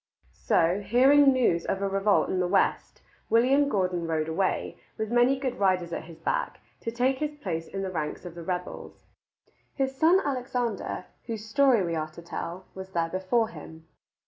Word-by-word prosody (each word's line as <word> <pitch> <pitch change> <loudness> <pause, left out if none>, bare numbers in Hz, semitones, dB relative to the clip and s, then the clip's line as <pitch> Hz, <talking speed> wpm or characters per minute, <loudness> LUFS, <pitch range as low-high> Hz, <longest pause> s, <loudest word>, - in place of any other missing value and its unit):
So, 170 +4 +3
hearing 270 +7 +5
news 235 -10 +2
of 190 - -1
a - - +1
revolt 195 +1 +2
in 185 - 0
the 180 - +1
west, 195 +2 0 0.3
William 265 +5 +4
Gordon 180 -6 0
rode 160 -1 -1
away, 185 +4 -1 0.2
with 220 0 -3
many 245 +3 +4
good 260 -2 -3
riders 185 -3 +1
at - - -4
his 165 -1 -12
back, - - -2 0.2
to - - -4
take 255 +3 +1
his 300 -1 -2
place 170 - -4
in 195 0 -5
the 190 - -3
ranks 155 0 -4
of 175 - -7
the 170 - -9
rebels. 180 +1 -6 0.7
His 270 -1 -1
son 330 +7 +5
Alexander, 250 -8 -2 0.2
whose 220 -2 -5
story 255 -2 +3
we 170 - -2
are 155 -1 -2
to 170 - -10
tell, 170 +2 -6
was 190 0 -8
there 165 -1 0
before 190 +6 0
him. 160 -7 -11
195 Hz, 180 wpm, -27 LUFS, 175-255 Hz, 0.7 s, hearing